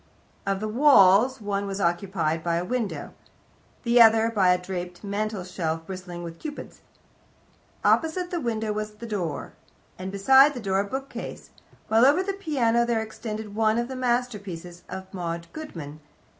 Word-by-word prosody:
Of 195 -1 0
the 215 - -2
walls, 245 -1 +5
one 200 -1 -2
was 195 0 -4
occupied 170 -3 0
by 170 0 0
the 175 - -2
window, 240 -1 -3 0.7
the 235 0 +5
other 225 0 +6
by 195 -5 +3
a 180 - +4
draped 180 0 -6
mantelshelf 185 -6 -3
bristling 180 -2 -7
with 165 -1 -8
Cupids. 295 -2 -8 1.0
Opposite 350 +2 +2
the 345 -2 -2
window 220 -3 -1
was 215 0 -4
the 235 - -9
door, 180 -10 -4 0.5
and 185 +1 -5
beside 265 +8 +6
the - - -4
door 195 -3 0
a 200 - +1
bookcase, 270 +6 -6 0.4
while 225 +2 +4
over 290 +8 +5
the 395 +1 -2
piano 265 - +1
there 235 -1 +1
extended 215 -1 -6
one 220 +1 +2
of 235 0 0
the 260 - -5
masterpieces 210 -9 -2
of 190 0 -6
Maud 170 -2 -4
Goodman. 165 - -8
210 Hz, 155 wpm, -25 LUFS, 180-240 Hz, 1.0 s, other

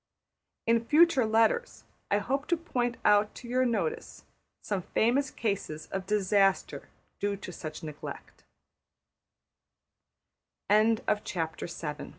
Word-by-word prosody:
In 230 0 +3
future 300 -2 +4
letters 225 - +1 0.3
I 205 - +3
hope 270 +7 -2
to 345 - +2
point 245 -7 -2
out 210 0 +4
to 245 - -10
your 255 +1 +2
notice 460 - -3 0.4
some 200 -3 -2
famous 255 +9 +1
cases 190 -8 -3
of 190 -1 -4
disaster 200 -1 +1 0.3
due 205 0 -1
to 185 - -8
such 155 -2 -7
negle 155 -2 -7
225 Hz, 100 wpm, -29 LUFS, 200-255 Hz, 0.4 s, future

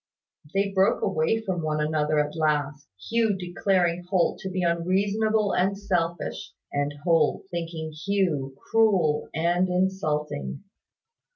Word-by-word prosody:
They 200 0 +1
broke 190 0 +2
away 195 +4 +1
from 185 -5 -2
one 155 -1 -1
another 150 0 +1
at 150 +1 0
last, 150 -2 0 0.2
Hugh 225 -3 +2
declaring 180 -1 0
Holt 185 -3 +1
to 190 - -5
be 185 -1 -2
unreasonable 200 +5 +1
and 195 +2 +1
selfish, 175 -4 -2 0.2
and 145 0 0
Holt 165 -1 +2
thinking 165 -2 -4
Hugh 155 -5 -1
cruel 190 -10 +2
and 175 +3 +2
insulting. 155 -6 -1
175 Hz, 120 wpm, -26 LUFS, 155-195 Hz, 0.2 s, broke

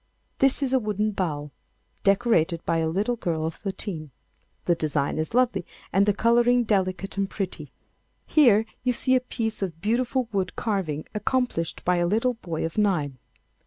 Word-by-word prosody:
This 270 +1 +3
is 265 -1 -1
a 260 - +5
wooden 210 -1 -1
bowl 150 -7 -3 0.5
decorated 195 -5 +2
by 165 - +1
a 160 0 +1
little 205 +8 0
girl 160 -6 -1
of 160 - -2
thirteen. 190 -6 -5 0.6
The 175 - +4
design 155 -2 -1
is 160 +8 -3
lovely 245 -7 +2 0.3
and 195 +3 +4
the 205 - +4
colouring 240 +2 +4
delicate 195 -2 -1
and 195 -1 0
pretty. 195 -3 -5 0.5
Here 230 -8 +5 0.2
you 250 0 +2
see 255 +2 +1
a - - +5
piece 225 -4 -3
of 175 -5 -3
beautiful 240 +5 0
wood 190 -3 -1
carving 185 -9 -2
accomplished 210 -5 -1
by 180 0 +3
a 175 0 +2
little 225 +6 +2
boy 170 -9 -4
of 165 +6 -3
nine. 155 -11 +1
200 Hz, 165 wpm, -25 LUFS, 165-235 Hz, 0.6 s, a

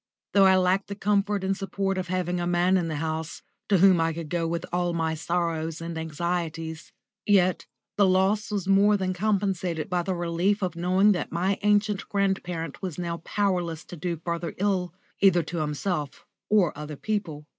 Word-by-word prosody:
Though 195 -1 +6
I 190 0 +6
lacked 185 +1 +2
the 200 - -5
comfort 205 0 +1
and 195 +1 0
support 195 0 -2
of 185 - -4
having 180 -1 -1
a 175 - -1
man 175 +2 +3
in 175 -3 +1
the 160 - -3
house, 160 +1 -4 0.3
to 200 - +5
whom 185 -2 +5
I 165 0 +1
could 165 -2 -7
go 170 -1 0
with 170 +1 -2
all 175 -1 0
my 160 -1 0
sorrows 165 -1 -2
and 165 0 -5
anxieties, 160 0 -3 0.4
yet 185 -3 +3 0.3
the 200 -1 +5
loss 190 +3 +2
was 200 -3 -2
more 200 +2 +5
than 185 -1 -1
compensated 190 -4 -1
by 180 -1 +1
the 185 +1 -2
relief 175 +4 0
of 180 -3 -2
knowing 185 +4 +3
that 180 - -2
my 185 +4 0
ancient 210 -1 +1
grandparent 180 -6 -2
was 185 -5 -4
now 170 -1 -3
powerless 175 -3 -1
to - - -9
do 170 +1 -3
further 170 0 -3
ill, 190 -2 0 0.3
either 180 -3 +5
to 170 +3 -6
himself 150 -1 -3 0.2
or 205 -6 +3
other 150 +1 -6
people. 170 -6 -3
180 Hz, 185 wpm, -26 LUFS, 165-195 Hz, 0.4 s, Though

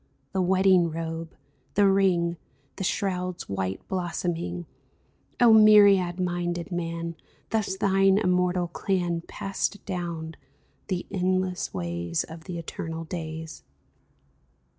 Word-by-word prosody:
The 190 - 0
wedding 185 -1 +4
robe, 165 0 -5 0.4
the 205 0 +5
ring. 180 -3 +2 0.4
The 190 - -3
shroud's 180 -1 -2
white 95 -1 -3
blossoming, 175 -1 -3 0.7
O 240 -2 +7
myriad 200 -4 +6
minded 175 -1 -2
man. 170 -1 -3 0.4
Thus 210 -3 0
thine 195 -1 +4
immortal 180 -2 +1
clan 175 -1 -1
Passed 195 +1 -3
down 170 -3 -4 0.5
the 180 -3 -2
endless 185 0 0
ways 85 -2 -2
Of 160 0 -11
the 180 -3 -5
eternal 165 0 -5
days 160 -1 -6
175 Hz, 105 wpm, -26 LUFS, 165-190 Hz, 0.7 s, O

